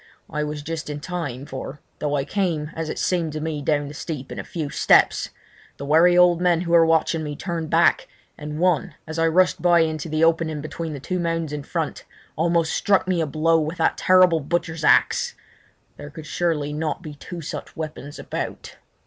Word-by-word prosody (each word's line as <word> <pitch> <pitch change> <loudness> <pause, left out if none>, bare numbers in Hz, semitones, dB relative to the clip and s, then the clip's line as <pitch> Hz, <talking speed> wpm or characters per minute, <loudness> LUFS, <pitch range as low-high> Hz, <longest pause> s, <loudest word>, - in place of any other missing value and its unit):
I 150 0 -1
was 150 -1 -5
just 160 0 -5
in 145 0 -4
time, 145 -6 -5
for, 135 +1 -7 0.2
though 145 -1 -1
I 140 -1 -1
came 165 -6 -1
as 160 -1 -3
it - - -4
seemed 170 -4 0
to 155 - -3
me 155 -1 -3
down 145 0 0
the 145 - -8
steep 145 -3 -6
in - - -6
a - - -4
few 155 -4 -5
steps, - - +3 0.5
the 140 - -6
wary 165 +4 +5
old 175 -1 +5
men 175 -2 +3
who 170 -1 -3
were 165 -1 +6
watching 160 0 +2
me 145 -1 -4
turned 165 -1 -4
back, 170 +1 +3 0.3
and 150 0 -6
one, 180 -1 +1
as 160 +1 -5
I 165 - +3
rushed 180 +1 +3
by 175 -1 +5
into 160 -1 -2
the 155 +1 0
opening 165 -2 +2
between 155 +2 -5
the 145 - -6
two 180 +7 -3
mounds 165 -3 -2
in 150 - -3
front, - - -4 0.3
almost 165 0 +1
struck 195 -2 +2
me 180 -3 +1
a 160 - -1
blow 160 +3 +2
with 155 +3 -3
that 165 - +2
terrible 185 -3 +5
butcher's 160 +1 -2
axe. 485 - +3 0.6
There 145 - -9
could 150 +1 -10
surely 150 -3 -1
not 155 +3 -3
be 155 -3 -7
two 170 +4 -8
such 150 - -7
weapons 150 -2 -6
about! - - -6
160 Hz, 205 wpm, -23 LUFS, 150-170 Hz, 0.6 s, were